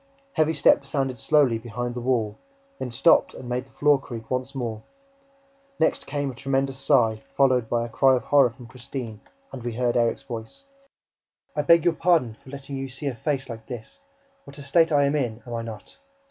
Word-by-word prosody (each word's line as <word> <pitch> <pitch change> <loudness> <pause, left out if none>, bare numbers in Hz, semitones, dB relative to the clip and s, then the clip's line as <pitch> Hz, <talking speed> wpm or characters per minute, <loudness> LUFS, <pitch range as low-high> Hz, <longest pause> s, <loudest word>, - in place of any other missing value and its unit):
Heavy 160 0 +2
steps 140 -2 +3
sounded 135 -4 -1
slowly 140 -6 +3
behind 120 +1 -4
the 120 - -5
wall, 115 -4 0 0.4
then 125 - -3
stopped 135 +8 +4
and 130 - -9
made 125 +1 -2
the - - -24
floor 145 -1 +3
creak 115 -4 -9
once 130 +2 -2
more. 115 -4 -3 1.0
Next 160 - +1
came 145 -2 -2
a - - -11
tremendous 135 +1 -1
sigh, 115 -6 +3 0.2
followed 130 -4 +3
by 115 -1 0
a - - -8
cry 135 +3 +4
of 125 - -2
horror 140 -1 +5
from 120 +1 -14
Christine, 120 -2 -7 0.3
and 130 - -7
we 120 -1 -4
heard 120 0 0
Erik's 115 -1 +1
voice: 115 - -8 0.9
"I 150 - +1
beg 165 +2 +5
your 175 - +4
pardon 165 -10 +2
for - - -14
letting 140 0 -7
you 135 0 -4
see 130 +3 -8
a 140 - 0
face 135 +3 -2
like 110 -2 -9
this! 120 -4 -8 0.5
What 140 +1 -12
a 145 - -8
state 165 +3 +3
I 145 -1 +4
am 140 +1 +1
in, 120 -5 -2
am 120 - -7
I 115 - -2
not? 110 - -10
130 Hz, 200 wpm, -25 LUFS, 120-140 Hz, 1.0 s, horror